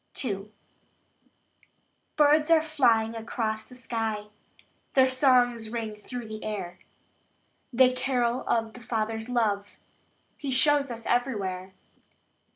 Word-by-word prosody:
II. 200 Hz, -2 st, -4 dB, 1.6 s
Birds 300 Hz, +1 st, +4 dB
are 325 Hz, -1 st, +5 dB
flying 240 Hz, -8 st, +2 dB
across 220 Hz, -1 st, -3 dB
the 250 Hz, -, -15 dB
sky; 225 Hz, -4 st, -3 dB, 0.7 s
Their 260 Hz, -1 st, +6 dB
songs 250 Hz, -4 st, +3 dB
ring 225 Hz, -2 st, -4 dB
through 235 Hz, +3 st, -7 dB
the 215 Hz, 0 st, -7 dB
air; 205 Hz, -5 st, -5 dB, 0.9 s
They 255 Hz, +1 st, +5 dB
carol 250 Hz, -1 st, 0 dB
of 225 Hz, -1 st, 0 dB
the 250 Hz, -, -12 dB
Father's 225 Hz, 0 st, -3 dB
love 205 Hz, -4 st, 0 dB, 0.6 s
He 285 Hz, -, -5 dB
shows 280 Hz, +2 st, +3 dB
us 230 Hz, -1 st, -6 dB
everywhere. 195 Hz, -7 st, -1 dB
235 Hz, 110 wpm, -27 LUFS, 215-255 Hz, 1.6 s, Their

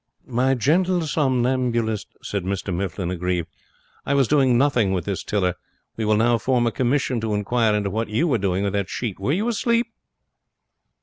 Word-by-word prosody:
'My 130 Hz, +2 st, +1 dB
gentle 175 Hz, +8 st, +2 dB
somnambulist,' 125 Hz, -6 st, 0 dB
said 100 Hz, -3 st, -3 dB
Mr 95 Hz, 0 st, -3 dB
Mifflin, 90 Hz, 0 st, -3 dB
aggrieved, 90 Hz, -1 st, -2 dB, 0.6 s
'I 140 Hz, -, +2 dB
was 135 Hz, -3 st, +3 dB
doing 135 Hz, -5 st, +3 dB
nothing 120 Hz, -7 st, +2 dB
with 90 Hz, -3 st, -2 dB
this 100 Hz, -2 st, -3 dB
tiller. 95 Hz, -4 st, 0 dB, 0.4 s
We 110 Hz, -, -2 dB
will 105 Hz, 0 st, +3 dB
now 115 Hz, +1 st, +3 dB
form 120 Hz, +1 st, +1 dB
a 115 Hz, -, +1 dB
commission 130 Hz, -1 st, 0 dB
to 110 Hz, -2 st, -1 dB
inquire 110 Hz, +1 st, +1 dB
into 100 Hz, -2 st, -1 dB
what 110 Hz, +2 st, -2 dB
you 130 Hz, +11 st, +1 dB
were 125 Hz, -7 st, +1 dB
doing 95 Hz, 0 st, 0 dB
with 100 Hz, 0 st, -1 dB
that 100 Hz, -2 st, -1 dB
sheet. 110 Hz, -7 st, -4 dB
Were 100 Hz, +8 st, -1 dB
you 200 Hz, +9 st, 0 dB
asleep?' 235 Hz, +1 st, 0 dB
115 Hz, 180 wpm, -23 LUFS, 100-135 Hz, 0.6 s, was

